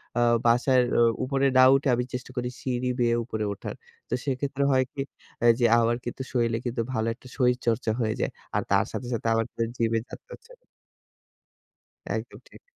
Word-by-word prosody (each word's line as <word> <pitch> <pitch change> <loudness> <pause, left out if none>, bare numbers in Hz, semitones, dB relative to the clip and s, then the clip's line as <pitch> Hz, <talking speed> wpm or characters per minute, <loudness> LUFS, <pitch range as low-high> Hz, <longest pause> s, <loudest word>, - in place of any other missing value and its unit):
অ্যা 120 - +2 0.2
বাসার 125 +2 +4 0.2
অ - - +5 0.2
উপরে 135 +1 0
না 130 - +8
উঠে 135 +1 0
আমি 125 - 0
চেষ্টা 125 +1 -5
করি 125 0 -1
সিঁড়ি 125 -1 -1
বেয়ে 120 -1 +3
উপরে 110 -2 -4
ওঠার। 100 - -7 0.3
তো - - -3
সেক্ষেত্রে 140 +1 -1
হয় 130 -1 +4
কি? 140 - -3 0.4
অ্যা 120 - +3
যে 120 - +3
আমার 115 0 +2
কিন্তু 120 - -5
শরীরে 115 -2 +1
কিন্তু 120 0 -1
ভালো 110 0 0
একটা 125 +2 -16
শরীরচর্চা 125 -3 +1
হয়ে 110 -1 0
যায়। - - -1 0.2
আর - - +2
তার - - +4
সাথে, 125 - -5
সাথে 115 0 -2
আমার 115 0 +1
কিন্তু 115 - -3
জিমে 115 -1 +1
যাতে - - -10
হচ্ছেনা। - - -15 1.5
একদম - - -7
ঠিক। - - -16
125 Hz, 185 wpm, -26 LUFS, 115-130 Hz, 1.5 s, না